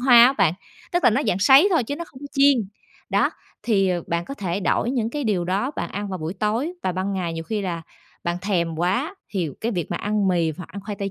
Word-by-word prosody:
hoa 245 -2 +8
á 260 - +3
bạn, 195 - +2 0.4
tức 350 - +1
là - - +7
nó 245 +6 +2
dạng 180 - +1
sấy 275 - +7
thôi 310 -9 +3
chứ 285 +5 -4
nó 340 - -5
không 265 -5 -15
chiên. 280 -1 +5 0.5
Đó, - - +3 0.3
thì, 195 -5 +2
ờ, 175 -2 0
bạn 170 0 -1
có 275 - -6
thể 190 -5 -3
đổi 230 +4 +1
những 230 -4 -1
cái 290 +1 -3
điều 195 -5 +1
đó 195 +9 0
bạn - - -3
ăn 205 +1 -4
vào 185 -1 -4
buổi 160 +4 -4
tối 220 - -1
và 185 - 0
ban 190 +2 -2
ngày 180 -3 -2
nhiều 165 0 -5
khi 215 +3 -2
là 170 -3 -3 0.4
bạn 170 0 0
thèm 170 -5 0
quá 200 - 0 0.2
thì 180 -7 -1
cái 230 +2 -1
việc 175 -5 -3
mà - - -1
ăn 210 -2 0
mì 170 -3 +1
hoặc 180 - -8
ăn 200 +3 -8
khoai 205 -1 -5
tây 195 0 -3
200 Hz, 260 wpm, -23 LUFS, 175-245 Hz, 0.5 s, hoa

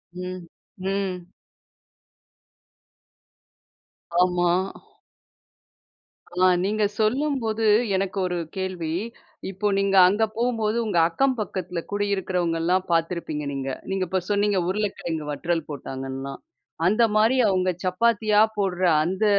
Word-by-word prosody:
ம், 180 -1 -6 0.3
ம். 190 -2 -2 3.0
ஆமா. 180 -1 +2 1.8
ஆ 180 +1 +2 0.2
நீங்க 210 +2 0 0.2
சொல்லும்போது 225 -1 0 0.3
எனக்கு 190 0 -2
ஒரு 180 -1 -2 0.2
கேள்வி. 185 -4 -3 0.6
இப்போ 195 +2 -2
நீங்க 195 0 +1
அங்க 205 +4 +2
போம்போது 230 -2 0
உங்க 205 -5 -1
அக்கம் 265 +10 +1
பக்கத்தில 185 -4 -3
குடியிருக்கிறவங்கெல்லாம் 185 -3 0
பார்த்துருப்பீங்க 165 -3 -1
நீங்க. 135 -1 -3 0.2
நீங்க 190 0 0
இப்ப 185 +2 -1
சொன்னீங்க, 205 -1 +2
உருளைக்கிழங்கு 185 -6 -2
வற்றல் 165 +2 -2
போட்டாங்கன்லாம். 135 -1 -6 0.4
அந்தமாரி 215 +3 +3
அவுங்க 185 -1 +1
சப்பாத்தியா 210 +3 +2 0.2
போடுற 190 -2 -1 0.2
அந்த 185 +6 0
190 Hz, 95 wpm, -24 LUFS, 175-210 Hz, 3.0 s, அந்தமாரி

